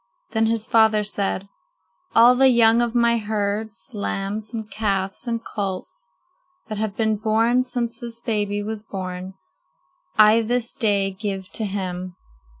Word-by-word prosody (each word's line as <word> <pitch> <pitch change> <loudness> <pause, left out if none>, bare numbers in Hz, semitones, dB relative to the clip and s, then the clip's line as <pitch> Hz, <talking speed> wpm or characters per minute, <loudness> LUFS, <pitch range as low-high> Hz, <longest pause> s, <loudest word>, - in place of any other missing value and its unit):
Then 225 0 +2
his 225 -1 -1
father 220 -2 +4
said: 200 -1 0 0.7
"All 235 +2 +8
the 265 +1 +5
young 235 -1 +5
of 240 0 -1
my 235 -1 +3
herds, 215 +1 -3
lambs 205 +1 -3
and 220 -2 -5
calves 195 +1 -2
and 230 -1 -2
colts, 190 -2 -5 0.6
that 215 -1 -4
have 215 -2 -3
been 220 -1 +1
born 225 +3 +2
since 245 -2 -3
this 235 -1 -7
baby 205 -3 -1
was 215 0 -4
born 185 -2 -6 0.8
I 215 +1 +7
this 235 +1 -1
day 200 -4 +1
give 195 -1 -5
to 220 - -3
him. 185 -2 -4
215 Hz, 145 wpm, -22 LUFS, 200-230 Hz, 0.8 s, All